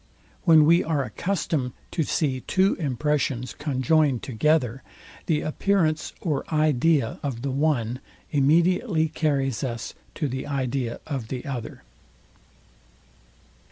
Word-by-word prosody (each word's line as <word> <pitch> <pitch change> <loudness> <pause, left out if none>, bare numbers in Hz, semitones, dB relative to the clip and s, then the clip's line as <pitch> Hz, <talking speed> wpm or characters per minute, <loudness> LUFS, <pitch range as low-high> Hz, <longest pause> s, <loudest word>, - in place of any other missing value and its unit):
When 160 -2 +7
we 170 +3 +5
are 150 -4 0
accustomed 155 -5 -2 0.2
to 165 - -1
see 140 -3 0
two 190 +7 +2
impressions 140 -3 -1
conjoined 145 -1 +1
together, 130 0 +1 0.5
the 155 -3 +2
appearance 160 -1 0
or 150 -6 -1
idea 155 -3 +2
of 130 -4 -4
the 140 - -1
one 130 -4 0 0.3
immediately 160 - +3
carries 140 -6 0
us 120 -4 -4 0.2
to 150 - -1
the 130 +1 -4
idea 130 -3 -2
of 135 -7 -4
the 125 +1 -5
other. 130 -5 -6
145 Hz, 115 wpm, -25 LUFS, 130-160 Hz, 0.5 s, When